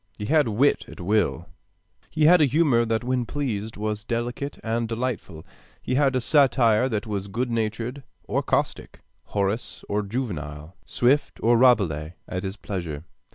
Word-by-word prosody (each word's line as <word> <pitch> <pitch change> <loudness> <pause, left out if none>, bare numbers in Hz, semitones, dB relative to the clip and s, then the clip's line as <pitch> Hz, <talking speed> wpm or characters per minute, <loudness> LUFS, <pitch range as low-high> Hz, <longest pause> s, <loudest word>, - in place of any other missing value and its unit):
He 105 - -5
had 150 +2 +3
wit 120 +7 +2
at - - -12
will. 105 +4 0 0.6
He 155 -1 +1
had 175 +3 +7
humor 140 -4 +3
that 115 +1 -1
when 125 +1 0
he 120 - -2
pleased 115 -5 -3
was 105 0 -3
delicate 120 +4 -3
and 115 +1 -1
delightful. 115 -9 -4 0.3
He - - -3
had 135 0 +3
a 130 - +1
satire 130 -4 +4
that 105 -4 -2
was 100 -3 -3
good 120 +5 -2
natured 115 +4 -2 0.2
or - - -1
caustic, - - -2 0.2
Horace 100 +3 -2
or 105 +1 0
Juvenal, 90 - -5
Swift 135 +4 +1
or 120 +1 +5
Rabelais, 95 - +3
at 90 - -3
his 95 +2 -5
pleasure. 85 -9 -5
115 Hz, 155 wpm, -25 LUFS, 100-130 Hz, 0.6 s, had